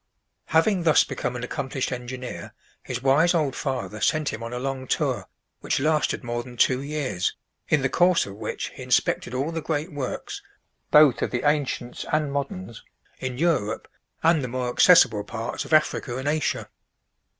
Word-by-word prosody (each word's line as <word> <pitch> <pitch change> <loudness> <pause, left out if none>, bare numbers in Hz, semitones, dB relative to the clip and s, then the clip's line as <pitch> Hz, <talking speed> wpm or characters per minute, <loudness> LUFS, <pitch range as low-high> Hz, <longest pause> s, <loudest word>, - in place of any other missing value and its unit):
Having 180 +4 +2
thus 160 -2 +5
become 125 - -4
an 120 - -5
accomplished 130 +1 -3
engineer, 125 0 -6 0.3
his 125 0 -5
wise 155 +6 +4
old 150 -5 +1
father 110 -7 -3
sent 155 +5 +2
him 110 - -5
on 115 0 -5
a 125 - -4
long 130 0 -4
tour, - - -1 0.3
which - - -1
lasted 150 -1 +1
more 120 0 -2
than 120 0 -12
two 130 +2 +3
years, 140 -11 -2 0.3
in 145 -3 +3
the - - +3
course 175 +4 +3
of 100 - -8
which 100 - -4
he - - -12
inspected 125 - +1
all 140 +5 -1
the 165 -1 -3
great 155 +2 -2
works, 140 -3 -5 0.5
both 150 -4 +6
of - - 0
the 125 +4 -1
ancients 140 -4 -1
and 155 -2 +1
moderns, 115 -7 -4 0.4
in 130 -1 -4
Europe, 140 -10 0 0.4
and 160 -3 +4
the - - -2
more 125 0 -2
accessible 120 - +6
parts 115 +2 -4
of - - -11
Africa 150 -5 +2
and 130 +2 -4
Asia. 155 +1 0
135 Hz, 170 wpm, -25 LUFS, 120-155 Hz, 0.5 s, both